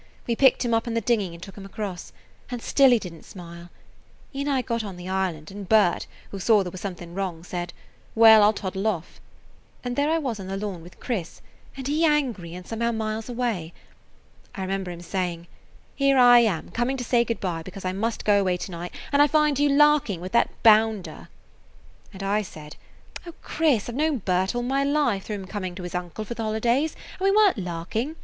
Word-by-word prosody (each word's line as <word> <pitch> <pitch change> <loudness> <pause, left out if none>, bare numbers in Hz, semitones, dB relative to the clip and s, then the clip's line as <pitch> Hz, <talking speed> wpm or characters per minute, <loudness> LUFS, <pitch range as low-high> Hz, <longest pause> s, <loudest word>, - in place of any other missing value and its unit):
We 235 - 0
picked 265 0 +4
him 235 - 0
up 225 +1 +1
in 230 - -2
the - - +3
dinghy 210 -5 0
and 170 - -11
took 195 - -10
him 200 - -9
across, 195 -2 -6 0.4
and 245 -1 -4
still 270 +3 +4
he 245 - +5
did 180 -6 -7
n't 165 - -14
smile. 170 -2 -11 0.6
He 275 - -4
and 285 - -1
I 265 -3 +1
got 230 -1 -2
on 195 -4 -7
the 180 0 -8
island, 185 -5 -2
and 200 -1 -8
Bert, 210 -5 +3 0.2
who 195 - -6
saw 210 +1 +4
there 180 - -6
was 185 - -9
something 175 -3 -6
wrong, 180 -3 -4
said, 175 -1 -5 0.4
"Well, 220 -1 +8
I 205 - +7
'll 215 - +3
toddle 195 0 -3
off." 175 -6 -3 0.6
And 245 -1 -3
there 285 +3 +1
I 325 - +2
was 255 -9 -3
on 190 - -7
the 195 0 -3
lawn 195 -4 -4
with 175 +2 -15
Chris, 195 -10 -4 0.4
and 265 -1 -5
he 300 +3 +1
angry 250 - 0
and 180 0 -9
somehow 235 +2 -1
miles 220 0 -3
away. 230 -9 -2 0.8
I 195 - -5
remember 190 0 -3
him 175 -1 -7
saying, 175 -2 -3 0.5
'Here 275 -1 +2
am 240 -8 +6
I - - -17
coming 240 +6 -1
to 250 - -4
say 240 0 +3
good 230 -1 -3
by, 175 -4 -3
because 185 +3 -9
I 185 - -1
must 220 +4 -2
go 205 -1 +5
away 185 -2 +1
to 185 - -6
night, 175 +1 -7 0.2
and 285 0 +4
I 290 - +7
find 300 -1 +2
you 290 0 +3
larking 285 - +4
with 185 +2 -7
that 235 - +3
bounder.' 220 -3 +3 0.8
And 195 -1 -8
I 205 +2 +1
said: 155 -6 -10 0.5
'O 335 - -9
Chris, 295 -10 +1
I - - -4
've - - -8
known 305 -1 +1
Bert 185 0 0
all 240 - -1
my 270 +3 +1
life 280 -9 +1
through 210 - -4
him 195 -2 -7
coming 185 -2 -5
to 185 - -7
his 175 - -6
uncle 180 +4 -4
for 235 - -5
the 230 - -6
holidays, 235 +8 0 0.2
and 380 - -1
we - - +5
were 420 +1 +6
n't - - -8
larking. 185 - -3
215 Hz, 225 wpm, -25 LUFS, 185-245 Hz, 0.8 s, Well